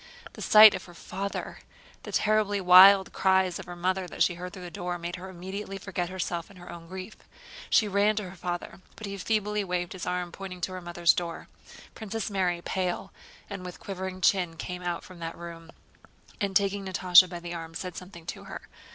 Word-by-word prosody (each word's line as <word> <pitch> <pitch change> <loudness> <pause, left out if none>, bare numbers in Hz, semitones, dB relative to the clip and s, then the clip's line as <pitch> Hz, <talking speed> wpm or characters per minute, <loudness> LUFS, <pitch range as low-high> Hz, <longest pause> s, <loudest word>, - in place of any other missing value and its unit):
The - - -10
sight 215 0 +9
of 185 - -5
her 175 - -14
father, 200 +3 -5 0.4
the - - -9
terribly 210 -1 +2
wild 190 +1 +8
cries 190 -2 +2
of 190 - -8
her 175 - -7
mother 185 +1 -1
that - - +1
she 175 - +2
heard 180 +1 -7
through 185 -1 -10
the 175 - -8
door, 175 +1 -4
made 175 0 -5
her 190 +1 -8
immediately 190 +2 -6
forget 185 -2 -4
herself 175 -2 -4
and 200 - -16
her 175 0 -11
own 170 -1 -10
grief. 190 +4 -8 0.5
She 215 - +4
ran 205 +2 +2
to 210 -2 -3
her - - -12
father, 175 +1 -5
but 220 - -8
he 200 0 -5
feebly 210 +1 0
waved 180 -1 -2
his 180 -2 -6
arm, 180 -1 -2
pointing 190 -1 -8
to 185 - -2
her 185 0 -6
mother's 175 -1 +2
door. 170 -2 -5 0.4
Princess 220 -1 -5
Mary, 180 -3 0
pale 185 -2 -3 0.3
and 195 -2 -7
with 180 -1 -8
quivering 190 -1 -6
chin, 175 -3 +2
came 180 +2 -6
out 175 -1 -3
from 185 -2 -13
that 165 0 -6
room 170 -1 -9 0.7
and 200 -3 -2
taking 200 +1 +2
Natásha 185 -1 +6
by 175 - -6
the 175 0 -7
arm 165 -1 -7
said 180 0 -5
something 180 -3 -10
to - - -7
her. - - -8
185 Hz, 205 wpm, -28 LUFS, 175-195 Hz, 0.7 s, sight